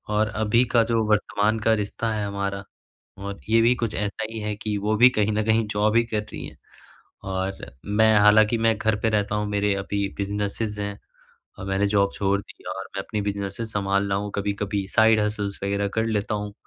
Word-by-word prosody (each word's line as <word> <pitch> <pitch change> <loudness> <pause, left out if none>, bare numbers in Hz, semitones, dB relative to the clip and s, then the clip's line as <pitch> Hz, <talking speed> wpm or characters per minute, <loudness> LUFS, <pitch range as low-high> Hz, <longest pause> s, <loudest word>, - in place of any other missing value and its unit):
और 110 +1 +3
अभी 110 +2 +2
का 115 -2 +5
जो 115 -1 +2
वर्तमान 105 +1 +1
का 110 +1 +3
रिश्ता 110 +2 -2
है 105 -1 -2
हमारा 100 -1 -3 0.6
और 100 0 -6
ये 115 +1 +5
भी 120 +2 +5
कुछ 115 -3 -3
ऐसा 105 +2 -2
ही 115 - -5
है 105 0 -3
कि, 105 0 -3
वो 105 +2 0
भी 125 +3 +8
कहीं 110 -3 0
न 110 +1 +1
कहीं 110 0 +2
जॉब 105 +1 +1
ही 115 - +5
कर 110 -2 -2
रही - - -6
हैं। - - -14 0.7
और 95 0 -3 0.2
मैं 110 +2 +4
हालाँकि 105 +2 +5
मैं 115 0 +2
घर 110 -1 +1
पे 115 - +1
रहता 105 -1 0
हूँ 105 0 -1
मेरे 105 0 +1
अभी 100 0 -2
बिज़नेसेस 105 +1 -2
हैं 100 0 -4 0.6
और 95 - -6
मैंने 95 +1 +1
जॉब 100 -1 +2
छोड़ 100 0 0
दी - - -16
और 95 - -5
मैं 95 - -2
अपनी 105 -2 -3
बिज़नेसेस 100 +2 -4
संभाल 100 0 0
रहा 95 - +1
हूँ 105 0 -5
कभी-कभी 100 -1 -2
साइड 110 -1 +5
हसल्स 105 -1 -2
वग़ैरह 100 +1 0
कर 110 0 +1
लेता 105 -1 -1
हूँ। 105 0 -5
105 Hz, 210 wpm, -24 LUFS, 100-110 Hz, 0.7 s, भी